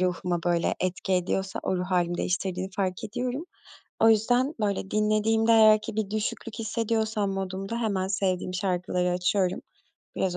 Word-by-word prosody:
ruhuma 180 -1 0
böyle 175 -1 +1
etki 185 +1 -2
ediyorsa 190 +1 -1
o 185 - 0
ruh 180 - -2
hâlimi 175 -2 +1
değiştirdiğini 185 +1 -2
fark 190 0 -1
ediyorum. 250 +7 -3 0.6
O 225 - +6
yüzden, 245 +6 +3
böyle, 200 -2 -1
dinlediğimde 215 +2 +2
eğer 215 -1 +7
ki 215 0 -7
bir 210 -2 -1
düşüklük 215 +1 -3
hissediyorsam 220 -2 -1
modumda 195 +3 -4
hemen 195 -4 -1
sevdiğim 185 -2 -1
şarkıları 180 -1 0
açıyorum, 180 +1 +1 0.6
biraz 180 -2 0
195 Hz, 145 wpm, -27 LUFS, 185-220 Hz, 0.6 s, eğer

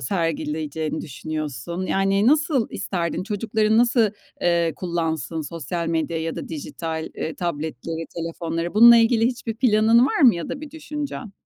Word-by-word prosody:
sergileyeceğini 155 0 -2
düşünüyorsun, 155 +4 -5
yani 195 +2 +2
nasıl 290 -3 +3
isterdin; 170 -2 -2
çocukların 215 +1 +1
nasıl, 235 -3 +3 0.3
eee, 170 -2 +2
kullansın 165 -3 -2
sosyal 165 +2 -4
medyayı 165 0 -2
da - - -6
dijital, 160 +1 -5
eee, 160 - -4
tabletleri, 160 -1 -4
telefonları? 165 +1 -3
Bununla 235 +2 +9
ilgili 230 0 +4
hiçbir 245 -2 -3
planın 230 0 +4
var 320 - -1
mı 245 -8 +7
ya 170 -2 -5
da 280 - -5
bir 305 -2 -8
düşüncen? 295 -7 -6
175 Hz, 135 wpm, -23 LUFS, 160-225 Hz, 0.3 s, Bununla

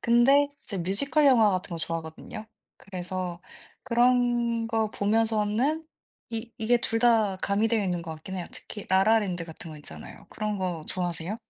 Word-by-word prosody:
근데 270 +5 +5 0.2
제가 195 -6 -4
뮤지컬 275 - +1
영화 230 -6 +6
같은 185 0 -2
거 170 - -3
좋아하거든요. 165 +7 -6 0.3
그래서 180 -1 -5 0.4
그런 240 -1 +2
거 225 -2 0
보면서는 225 +8 +1 0.4
이 225 0 -5
이게 235 +2 +3
둘 225 -1 -1
다 225 -5 +3
가미되어 210 +3 +1
있는 175 -2 -1
것 165 -1 -6
같긴 190 +5 -7
해요. 180 - -4
특히 210 - -8
라라랜드 190 -2 +3
같은 160 0 -10
거 155 - -9
있잖아요. 145 - -11
그런 210 -1 -2
거 180 -4 -2
좋아하세요? 175 +1 -2
210 Hz, 340 characters per minute, -27 LUFS, 180-235 Hz, 0.4 s, 영화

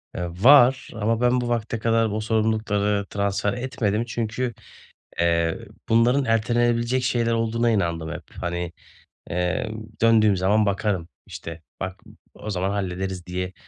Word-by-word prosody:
Eee, 90 - -3 0.2
var 130 -1 +6
ama 115 +1 -1
ben 125 0 +3
bu 120 - -3
vakte 115 -1 -2
kadar 115 0 +2
o 105 +1 -2
sorumlulukları 110 -2 0
transfer 100 0 -1
etmedim 120 -4 -1
çünkü, 120 +1 -3 0.7
eee, 85 -1 +1 0.3
bunların 120 +5 +3
ertelenebilecek 120 +2 +1
şeyler 120 -2 +1
olduğuna 115 +1 +1
inandım 85 -6 -1
hep. - - -9
Hani, 85 -1 -3 0.6
eee, 90 +5 -1 0.3
döndüğüm 110 -3 +5
zaman 105 +4 +3
bakarım, 100 -4 -1 0.2
işte, 80 -1 -8 0.2
bak 95 -1 -6
m - - -15 0.2
o 110 - -8
zaman 95 -1 -1
hallederiz 95 -2 -3
diye 90 +1 -4
110 Hz, 135 wpm, -24 LUFS, 95-115 Hz, 0.7 s, var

